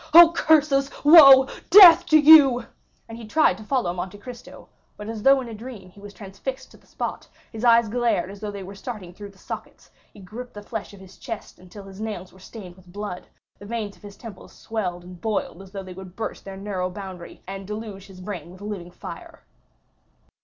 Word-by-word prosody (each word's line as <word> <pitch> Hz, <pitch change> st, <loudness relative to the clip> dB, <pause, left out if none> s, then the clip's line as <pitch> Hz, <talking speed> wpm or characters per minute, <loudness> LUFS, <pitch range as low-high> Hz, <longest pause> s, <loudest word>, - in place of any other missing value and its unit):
Oh, 340 Hz, -1 st, +10 dB
curses, 290 Hz, -4 st, +2 dB
woe, 280 Hz, -4 st, +9 dB, 0.2 s
death 350 Hz, -3 st, +9 dB
to 310 Hz, -, +5 dB
you!" 290 Hz, -6 st, +7 dB, 0.5 s
He 225 Hz, -1 st, -10 dB
tried 310 Hz, -, +2 dB
to -, -, -10 dB
follow 235 Hz, -6 st, -1 dB
Monte 185 Hz, +2 st, -6 dB
Cristo; 245 Hz, +2 st, -12 dB, 0.3 s
but 210 Hz, -, -9 dB
as 225 Hz, -1 st, -6 dB
though 270 Hz, +4 st, +5 dB
in 250 Hz, -, -8 dB
a 230 Hz, -, -8 dB
dream 215 Hz, -4 st, -11 dB
he 200 Hz, -, -18 dB
was 205 Hz, 0 st, -11 dB
transfixed 240 Hz, +7 st, -8 dB
to -, -, -17 dB
the -, -, -28 dB
spot,—his 225 Hz, 0 st, -8 dB
eyes 235 Hz, -1 st, +4 dB
glared 230 Hz, -5 st, -1 dB
as 200 Hz, -, -12 dB
though 210 Hz, 0 st, -6 dB
they 200 Hz, -1 st, -8 dB
were 190 Hz, +2 st, -10 dB
starting 200 Hz, -5 st, -9 dB
through 205 Hz, +2 st, -11 dB
the 195 Hz, -, -21 dB
sockets; -, -, -10 dB, 0.2 s
he -, -, -17 dB
griped 220 Hz, +6 st, -10 dB
the 205 Hz, -, -9 dB
flesh 220 Hz, 0 st, -7 dB
on 195 Hz, -, -16 dB
his 190 Hz, -1 st, -16 dB
chest 225 Hz, -3 st, -8 dB
until 185 Hz, +3 st, -13 dB
his 195 Hz, +1 st, -12 dB
nails 205 Hz, -5 st, -6 dB
were 190 Hz, -, -18 dB
stained 190 Hz, -2 st, -12 dB
with 180 Hz, -1 st, -19 dB
blood; 205 Hz, -2 st, -7 dB, 0.3 s
the 205 Hz, -, -12 dB
veins 215 Hz, -3 st, -5 dB
of -, -, -25 dB
his 205 Hz, -1 st, -13 dB
temples 225 Hz, -4 st, -12 dB
swelled 180 Hz, -6 st, -5 dB
and 180 Hz, -1 st, -13 dB
boiled 215 Hz, -4 st, -3 dB
as 195 Hz, -, -13 dB
though 195 Hz, 0 st, -8 dB
they 185 Hz, -1 st, -10 dB
would 185 Hz, 0 st, -12 dB
burst 225 Hz, -, -6 dB
their 195 Hz, -1 st, -9 dB
narrow 190 Hz, -2 st, -4 dB
boundary, 185 Hz, -2 st, -10 dB
and 195 Hz, 0 st, -8 dB
deluge 210 Hz, -2 st, -8 dB
his 185 Hz, -2 st, -14 dB
brain 180 Hz, -3 st, -7 dB
with 185 Hz, +2 st, -15 dB
living 200 Hz, -4 st, -7 dB
fire. 180 Hz, -, -11 dB
205 Hz, 210 wpm, -23 LUFS, 190-240 Hz, 0.5 s, Oh